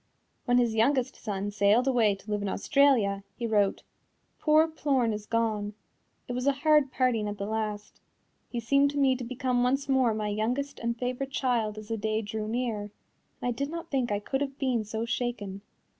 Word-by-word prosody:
When 245 -1 +3
his 240 -2 +3
youngest 255 +3 +2
son 205 -2 -4
sailed 205 +5 +3
away 230 -6 +3
to 195 +2 -10
live 205 0 0
in 200 - -2
Australia, 225 -5 +3
he 235 - -4
wrote: 205 -3 +1 0.6
"Poor 310 +1 +4
Plorn 275 -7 0
is 210 0 -6
gone. 215 -3 -1 0.5
It 245 - -4
was 250 +2 -2
a 280 - +5
hard 300 -3 +5
parting 240 -5 +1
at 205 0 -4
the 200 - -3
last. 210 -1 -4 0.5
He 240 - -3
seemed 275 +5 +3
to 290 - -5
me 270 -2 +4
to 255 - -5
become 250 0 -1
once 270 +3 +1
more 260 -5 +3
my 210 -1 -2
youngest 245 +7 -2
and 235 0 -2
favorite 255 +2 -3
child 240 -6 0
as 215 0 -9
the 225 - -1
day 220 +1 -1
drew 215 +1 -4
near, 230 -2 -1
and 205 0 -8 0.5
I 245 - +1
did 280 +4 -3
not 335 +1 -6
think 260 -5 0
I 205 - +2
could 270 +7 -3
have 275 -1 -3
been 255 -5 0
so 220 +2 -3
shaken." 225 -4 -3
235 Hz, 200 wpm, -28 LUFS, 210-265 Hz, 0.6 s, a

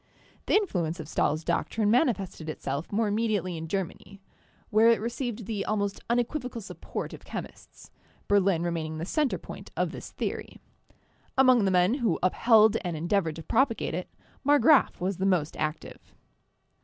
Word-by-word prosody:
The - - +3
influence 180 - 0
of 155 - -6
Stahl's 155 0 0
doctrine 210 +4 0
manifested 200 - 0
itself 140 0 -4
more 215 +2 +1
immediately 205 -4 0
in 160 0 -6
Germany, 195 +2 -5 0.5
where 220 +2 +5
it 230 - +4
received 235 0 -4
the 205 -2 -2
almost 205 -2 -1
unequivocal 245 +1 -1
support 200 - -6
of - - -10
chemists, - - -9 0.4
Berlin 195 -4 +3
remaining 160 -2 -3
the 160 - -4
center 295 - 0
point - - -10
of - - 0
this - - -8
theory. - - -5 0.8
Among 255 -5 +5
the - - +3
men 180 +3 +3
who 235 - +1
upheld 220 +3 +5
and 175 -3 -3
endeavored 170 0 0
to 165 - -8
propagate 230 - +1
it, 180 +2 -4 0.3
Marggraf 290 +1 +4
was 185 +1 -2
the 190 - -1
most 170 -5 +1
active. 155 0 -4
200 Hz, 155 wpm, -27 LUFS, 170-230 Hz, 0.8 s, where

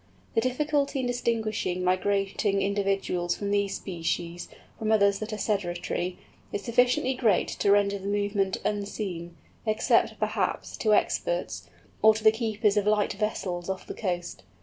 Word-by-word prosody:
The 225 - +3
difficulty 280 +2 0
in - - -2
distinguishing 220 -6 -1
migrating 195 +2 +1
individuals 195 -3 0
of 200 -1 -2
these 200 -1 +1
species 175 -1 -3 0.3
from 220 0 0
others 200 -2 +4
that 215 +1 -5
are 215 - -3
sedentary, 180 -3 -2 0.3
is 200 - -3
sufficiently 245 +3 +2
great 230 -7 +2
to 200 - 0
render 200 0 +3
the 195 - -6
movement 205 -1 0
unseen, 195 -5 -3 0.3
except, 215 -1 +2
perhaps, - - -1
to 215 -2 +3
experts, 95 - -1 0.3
or 220 0 +7
to 220 - -5
the 220 - +8
keepers 215 -2 0
of 205 0 +2
light 210 -1 +2
vessels 190 -4 -3
off 190 -1 -3
the - - -6
coast. 175 - -3
200 Hz, 150 wpm, -27 LUFS, 185-220 Hz, 0.3 s, the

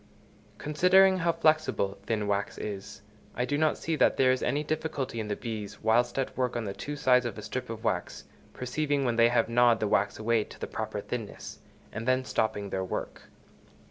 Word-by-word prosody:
Considering 185 +5 +4
how 170 0 +2
flexible 155 -13 +1
thin 110 -2 0
wax 100 0 -1
is, 100 -1 -6 0.3
I 125 - 0
do 145 - -1
not 155 +1 +2
see 165 - -2
that - - +3
there 130 -1 +5
is 130 - 0
any 145 +4 0
difficulty 150 -6 -3
in 110 - -3
the 105 - -2
bees, 105 -3 -6
whilst 120 +3 +2
at 135 - -2
work 125 -2 -1
on 120 -2 -2
the 100 - -4
two 145 +7 -6
sides 125 -3 +4
of 120 -4 -4
a - - -7
strip - - -5
of - - -6
wax, - - -2 0.3
perceiving 140 +2 -1
when 120 -2 0
they 115 0 +6
have 120 -1 +2
gnawed 120 0 +4
the 105 - 0
wax 100 0 +1
away 110 0 +1
to - - -14
the - - -3
proper - - -4
thinness, - - -6 0.3
and 115 +2 -5
then 130 0 +2
stopping 105 -4 -1
their 95 - -1
work. 95 - -6
120 Hz, 205 wpm, -28 LUFS, 110-145 Hz, 0.3 s, they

